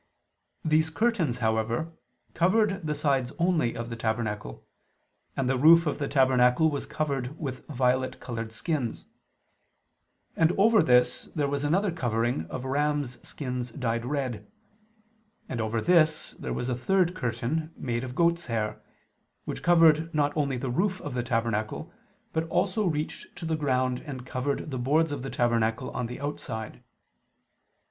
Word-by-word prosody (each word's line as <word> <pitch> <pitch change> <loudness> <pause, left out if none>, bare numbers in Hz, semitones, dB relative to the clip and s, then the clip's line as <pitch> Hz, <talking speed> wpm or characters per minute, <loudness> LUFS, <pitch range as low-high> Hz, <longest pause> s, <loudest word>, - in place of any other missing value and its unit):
These 155 +1 +3
curtains, 170 - +1
however, 115 +8 0 0.4
covered 195 0 +2
the 150 - 0
sides 135 -4 +1
only 165 -9 +1
of 115 0 -5
the - - -3
tabernacle; 110 - -3 0.7
and 135 - 0
the 130 0 +1
roof 165 +4 +7
of 150 -1 -1
the 140 - -1
tabernacle 130 +2 +4
was 145 - -3
covered 140 -2 -2
with 130 -5 -5
violet 130 -2 0
colored 115 -2 -5
skins; 125 0 -3 1.3
and 165 +1 +3
over 220 +1 +5
this 125 -4 +3
there 145 -3 +1
was 140 0 -2
another 185 +7 +2
covering 120 - -1
of 130 - -5
rams' 145 -1 0
skins 125 -3 -4
dyed 115 -2 -2
red; 125 -6 -3 1.0
and 120 -3 -3
over 110 +1 -1
this 160 +2 +3
there - - -5
was 90 - -2
a 130 - 0
third 180 +7 +2
curtain 140 +3 -2
made 120 -1 -2
of 125 -1 -6
goats' 170 0 +2
hair, 110 -3 -2 0.6
which - - -5
covered 165 -2 +5
not 145 -1 +1
only 140 -4 0
the 125 0 -3
roof 185 +7 0
of 145 -6 -5
the 125 - 0
tabernacle, 115 -3 -2 0.4
but 160 0 0
also 200 +4 +1
reached 155 -2 -3
to 170 - -7
the 160 0 0
ground 130 -4 0
and 130 -3 -6
covered 140 +4 -2
the 130 - -3
boards 150 +5 +2
of 145 -3 -3
the 135 - -5
tabernacle 115 -2 0
on 125 - -3
the 125 +2 -7
outside. 130 -6 -5
135 Hz, 155 wpm, -27 LUFS, 120-160 Hz, 1.3 s, roof